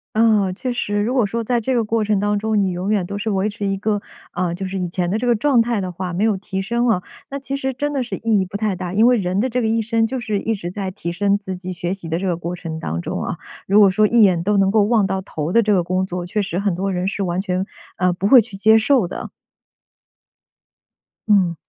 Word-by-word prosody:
嗯， 215 -4 +3
确 255 +6 -3
实， 205 -4 -1
如 225 +4 0
果 250 -5 +3
说 230 +3 -2
在 240 +1 +1
这 260 +4 -1
个 235 - +2
过 220 0 0
程 210 -1 +1
当 205 +1 +1
中， 215 0 0
你 190 - +1
永 185 +3 -2
远 200 -4 +2
都 200 +3 -5
是 220 +1 -2
维 195 +2 0
持 205 0 -5
一 195 0 0
个， 210 +1 0 0.3
呃， 175 -2 -1
就 195 - -5
是 190 0 -3
以 180 -1 -2
前 175 0 -2
的 210 - 0
这 245 - -2
个 240 -1 +3
状 265 +1 +2
态 230 -3 +1
的 185 -1 -4
话， 180 0 -5
没 190 +5 0
有 215 -3 +2
提 195 0 -4
升 235 +4 0
了， 220 -6 +2 0.3
那 280 - -3
其 275 0 -4
实 265 -1 -2
真 290 +4 -2
的 270 -3 -1
是 240 - -5
意 225 -2 +1
义 190 - 0
不 185 +2 -11
太 205 -2 0
大。 180 0 -5
因 220 +4 +5
为 250 - +5
人 190 -3 -1
的 255 +5 +1
这 250 +2 -1
个 225 - 0
一 225 +1 +1
生， 225 0 +1
就 260 +3 -3
是 215 -3 -2
一 225 - -1
直 190 -4 -5
在 190 0 -4
提 170 -2 -5
升 200 +2 +1
自 190 -2 -5
己 185 0 -6
学 175 +1 -3
习 190 -4 -7
的 165 +1 -1
这 195 - -2
个 175 -2 0
过 175 +1 -4
程 160 -2 -6
当 80 - -3
中 - - -4
啊， - - -3 0.3
如 200 +2 +4
果 200 - +7
说 210 +3 +3
一 235 +2 +4
眼 180 -5 +4
都 205 +2 +1
能 195 -1 +3
够 210 +1 +4
望 210 -2 +2
到 190 0 -1
头 160 -4 -4
的 230 +4 +4
这 210 -1 +2
个 180 - +2
工 185 +2 0
作， 180 -1 -4
确 210 +4 -2
实 185 -1 -3
很 200 -3 0
多 195 +2 -2
人 180 +1 -1
是 200 0 -2
完 180 +1 -1
全， 185 -1 -2 0.3
呃， 180 -1 +2
不 190 +3 -1
会 260 +3 +8
去 220 -3 -3
接 220 +3 +5
受 230 -3 +3
的。 - - -7 2.0
嗯， 190 -5 +3
200 Hz, 300 characters per minute, -20 LUFS, 185-225 Hz, 2.0 s, 会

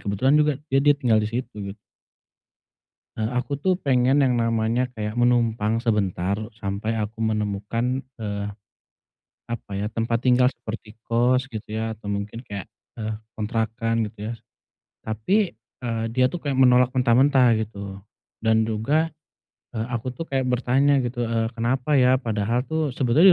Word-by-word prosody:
kebetulan 100 +7 +1
juga 150 -1 +4 0.2
dia 135 - +5
dia 145 0 +4
tinggal 120 -6 +3
di 105 - -1
situ, 120 +1 -4
gitu. 100 -1 -6 1.4
Eee, 110 0 -1
aku, 125 +3 -1
tuh, 185 +6 +1
pengen 130 0 +3
yang 130 -3 +3
namanya 115 +2 +1
kayak 105 -1 -4
menumpang 115 -2 +2
sebentar 100 -5 0 0.2
sampai 110 +3 -2
aku 110 +2 -3
menemukan, 110 +4 -1 0.2
eee, 100 -1 -3 1.0
apa 115 -3 -5
ya, 105 +2 -2
tempat 115 +1 -1
tinggal 125 -1 +5
seperti 110 -4 -5
kos 125 +3 +2
gitu, 110 -1 -6
ya, 110 0 -1
atau 110 -1 -9
mungkin 100 +2 -3
kayak, 100 -3 -7 0.2
eee, 110 -1 -4 0.2
kontrakan 115 +1 -1
gitu, 105 +1 -6
ya. - - -3
S - - -33 0.6
tapi, 110 - 0 0.2
eee, 115 -2 -2
dia, 130 +1 +3
tuh, 170 +4 -7
kayak 135 -2 0
menolak 125 -1 +5
mentah-mentah 125 -1 +4
gitu. 100 -3 -6 0.4
Dan 110 0 +3
juga, 140 +10 +1 0.7
eee, 110 0 -2
aku, 125 +1 -3
tuh, 145 - -5
kayak 135 -1 0
bertanya 130 +2 +3
gitu, 120 0 -2
eee, 115 -1 0
kenapa 130 +5 +1
ya. 125 0 +5
Padahal, 115 -1 0
tuh, 155 -1 -2
sebetulnya 135 +8 +4
115 Hz, 150 wpm, -24 LUFS, 110-130 Hz, 1.4 s, dia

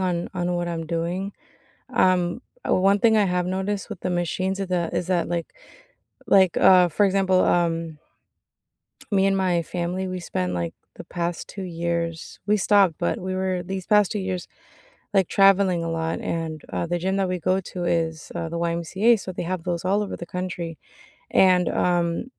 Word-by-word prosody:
on 175 -2 -1
on 180 0 -1
what 175 0 -2
I'm 165 -1 -3
doing. 175 +4 -2 0.6
Um, 180 +4 +2 0.2
1 195 +2 +3
thing 225 -2 +4
I 210 - +4
have 180 -1 0
noticed 195 +3 -2
with 205 -4 -7
the 185 - -2
machines 185 +2 -1
is 195 - -2
the 175 -2 0
is 180 - -1
that, 180 -2 +1
like 170 -1 -3 0.7
like, 190 -3 +4
uh, 180 -2 +6
for 205 +6 +2
example, 190 -1 +3
um 165 -3 0 1.1
me 195 0 +4
and 195 0 +2
my 180 -3 +1
family, 180 +2 -3
we 185 0 -4
spent, 90 - -3
like, 85 -2 -3 0.2
the - - -10
past 175 -1 -3
2 195 - -8
years 170 -1 -3
we 210 +1 +3
stopped, 195 -3 +4
but 175 - -1
we 185 +1 -3
were, 185 -1 -1
these 190 0 -5
past 210 -2 +4
2 210 - -2
years, 185 -2 -4 0.7
like, 190 -2 +4
traveling 195 -3 +4
a 165 - -3
lot. 165 0 -2
And, 160 -2 -3
uh, 170 - -1
the 175 +1 -1
gym 190 +3 -1
that 195 -2 +1
we 180 - -1
go 185 +3 +1
to 180 -1 -6
is, 165 -2 -1
uh, 170 -1 -3
the 170 +1 -4
YMCA, 170 +7 +2
so 185 - -6
they - - -4
have 180 -1 -3
those 175 -1 -2
all 200 +3 +2
over 200 - -5
the 170 - -8
country. 175 -3 -5 0.5
And, 180 -2 +4
um, 175 +1 0
180 Hz, 190 wpm, -24 LUFS, 170-190 Hz, 1.1 s, uh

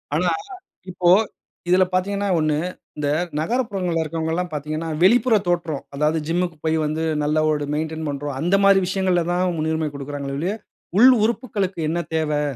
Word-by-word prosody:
ஆனா - - +2 0.6
இப்போ 175 -1 0 0.6
இதில 185 +1 +5
பார்த்தீங்கன்னா 200 +2 0
ஒண்ணு, 155 -1 +1 0.4
இந்த 145 -1 -1 0.3
நகரப்புறங்கள்ல 190 -4 -1
இருக்கவங்கல்லாம் 165 +3 -2
பார்த்தீங்கன்னா, 155 +2 -4
வெளிப்புற 230 +3 +5
தோற்றம். 170 -5 -1
அதாவது 150 +2 +1
ஜிம்முக்கு 175 -1 -1
போய் 160 0 +2
வந்து, 155 +2 -1 0.2
நல்ல 150 +1 +1
ஒரு 150 -1 0
மெயின்டெயின் 160 +1 -3
பண்றோம். 145 -1 -4
அந்த 175 +6 +2
மாரி 195 -1 +6
விஷயங்கள்ல 185 -2 +1
தான் 180 +1 +1
முன்னுரிமை 160 0 -1
கொடுக்கிறாங்களே 140 0 -5
ஒழிய, 180 +7 -1 0.4
உள் 250 +4 +8 0.2
உறுப்புக்களுக்கு 205 -6 -2
என்ன 170 +2 -1 0.2
தேவை? 150 -2 0
165 Hz, 145 wpm, -22 LUFS, 155-185 Hz, 0.6 s, உள்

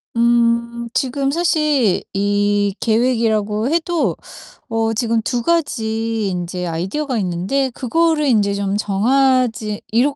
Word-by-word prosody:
음 235 0 +1
지금 270 +1 0
사실 300 - +1
이 205 0 +1
계획이라고 225 -2 +1
해도 335 +1 0 0.5
어 225 0 0
지금 225 0 0
2 240 +2 -2
가지 225 -9 -1
인제 180 0 -4
아이디어가 195 - -2
있는데 195 +9 -1
그거를 315 +5 +1
인제 210 -6 +2
좀 200 0 -1
정하지 225 0 +1
이렇 260 +6 +2
230 Hz, 230 characters per minute, -19 LUFS, 205-265 Hz, 0.5 s, 인제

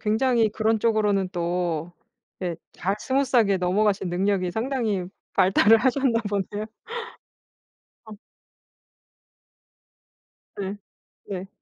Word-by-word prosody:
굉장히 225 +1 +2
그런 220 +1 +1
쪽으로는 210 -4 +2
또 175 -1 -2 0.5
예 175 -3 -2 0.2
잘 195 +3 -2
스무스하게 250 -7 +2
넘어가신 195 +2 +1
능력이 185 +1 0
상당히 220 -3 -1 0.3
발달을 195 +3 +5
하셨나 260 -1 +2
보네요. 205 +1 -2 1.4
어. 220 -1 -10 2.4
네. 200 0 -4 0.5
네. 190 -1 -4
205 Hz, 200 characters per minute, -25 LUFS, 185-225 Hz, 2.4 s, 발달을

